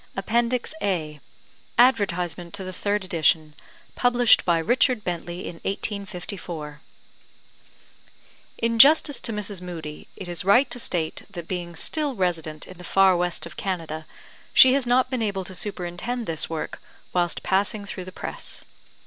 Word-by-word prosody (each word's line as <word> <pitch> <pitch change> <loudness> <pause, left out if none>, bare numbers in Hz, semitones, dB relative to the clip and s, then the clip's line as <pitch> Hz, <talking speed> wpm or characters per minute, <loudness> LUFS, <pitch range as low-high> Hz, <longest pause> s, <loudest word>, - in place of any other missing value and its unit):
APPENDIX 235 +7 0
A 155 -6 -2 0.6
ADVERTISEMENT 180 - +2
TO 195 - -5
THE 185 0 -6
THIRD 205 +1 -1
EDITION 160 -3 +2 0.4
Published 245 -1 +4
by 170 -2 +3
Richard 240 - +2
Bentley 175 -1 -4
in 170 - -7
1854 180 -7 -4 1.8
In 230 0 0
justice 290 +1 +7
to - - -1
Mrs. 205 -3 -3
Moodie, 160 -4 -7
it 190 - -7
is 175 +1 -3
right 220 +9 +5
to 245 - -2
state 170 -8 -1
that 170 -1 -8
being 175 -2 -4
still 295 - 0
resident 165 -5 -2
in 185 -1 -13
the - - -10
far 190 +1 +4
west 175 0 0
of - - -11
Canada, 160 -5 -4 0.5
she 260 -1 +9
has 270 -2 +1
not 255 +2 +3
been 255 -3 -1
able 200 -3 -1
to 185 - -8
superintend 200 +5 -4
this 160 -4 -1
work 160 -1 -5 0.3
whilst 175 -1 +1
passing 200 +2 0
through 185 -2 -6
the 185 - -8
press. - - -6
185 Hz, 150 wpm, -24 LUFS, 170-225 Hz, 1.8 s, she